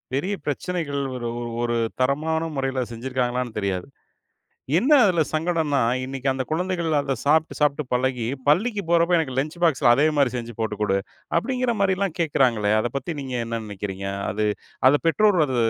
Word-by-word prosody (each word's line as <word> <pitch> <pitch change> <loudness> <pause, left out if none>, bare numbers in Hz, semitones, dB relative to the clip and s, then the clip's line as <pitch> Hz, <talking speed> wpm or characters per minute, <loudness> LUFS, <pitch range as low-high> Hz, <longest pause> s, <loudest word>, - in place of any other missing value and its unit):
பெரிய 185 +9 -1
பிரச்சனைகள் 145 -1 -2
ஒரு 120 -1 -3 0.3
ஒரு 120 0 0 0.3
தரமான 155 +5 +1 0.2
முறையில 135 -1 -1
செஞ்சிருக்காங்களான்னு 125 -1 -2
தெரியாது. 95 0 -2 0.9
என்ன 265 +8 +1
அதுல 175 -4 +3
சங்கடன்னா, 155 -3 0 0.2
இன்னிக்கு 135 +1 -4
அந்த 130 0 -2
குழந்தைகள் 175 -1 -1
அத 140 -2 -1
சாப்ட்டு, 160 +2 +2
சாப்ட்டு 150 0 +2
பழகி, 125 -2 0 0.2
பள்ளிக்கு 210 +6 +2
போறப்போ 170 +1 +4
"எனக்கு 130 -5 -2
லஞ்ச் 155 +5 -3
பாக்ஸ்ல 135 -6 +4
அதே 145 +3 +3
மாரி 140 -4 +3
செஞ்சு 120 -1 -6
போட்டு 110 -2 -2
கொடு." 100 -2 +2 0.4
அப்டிங்கிற 250 +4 0
மாரிலாம் 190 -2 0
கேக்கராங்களே! 120 -9 +2
அத 120 - -1
பத்தி 170 +4 -4
நீங்க 130 -2 -5
என்ன 115 -1 -3
நினைக்கிறிங்க. 100 -1 -5 0.2
அது 105 0 -1 0.4
அத 140 - +4
பெற்றோர் 205 +2 +4
அத 130 - -2
140 Hz, 155 wpm, -23 LUFS, 120-170 Hz, 0.9 s, போறப்போ